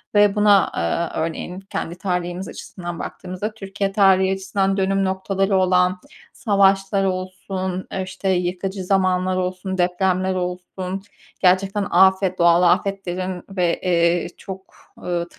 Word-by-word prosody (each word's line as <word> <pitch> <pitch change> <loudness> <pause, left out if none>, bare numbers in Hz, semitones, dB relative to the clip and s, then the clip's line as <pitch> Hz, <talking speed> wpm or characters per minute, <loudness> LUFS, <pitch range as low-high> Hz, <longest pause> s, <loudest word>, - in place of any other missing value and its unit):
ve 205 0 +5
buna, 205 -1 +5
aaa, 160 - -2
örneğin 165 +3 -4
kendi 180 -3 -5
tarihimiz 180 -1 -3
açısından 175 -2 -7
baktığımızda 185 +4 -5
Türkiye 195 -1 -3
tarihi 190 -1 +4
açısından 195 0 -1
dönüm 195 0 +1
noktaları 195 +1 0
olan, 180 0 +2 0.3
savaşlar 195 -2 +2
olsun, 185 0 -3
e, 190 - -2
işte 190 +1 -4
yıkıcı 185 +1 -1
zamanlar 185 -1 +1
olsun, 185 +1 -3
depremler 185 +1 +1
olsun, 180 +1 -4 0.4
gerçekten 195 +2 +2
afet, 190 0 +4
doğal 170 +1 +5
afetlerin 185 -1 0
ve, 180 -3 0 0.4
ııı, - - -4
çok, 190 0 -10 0.3
eee, 175 -1 -1
190 Hz, 120 wpm, -21 LUFS, 180-195 Hz, 0.4 s, ve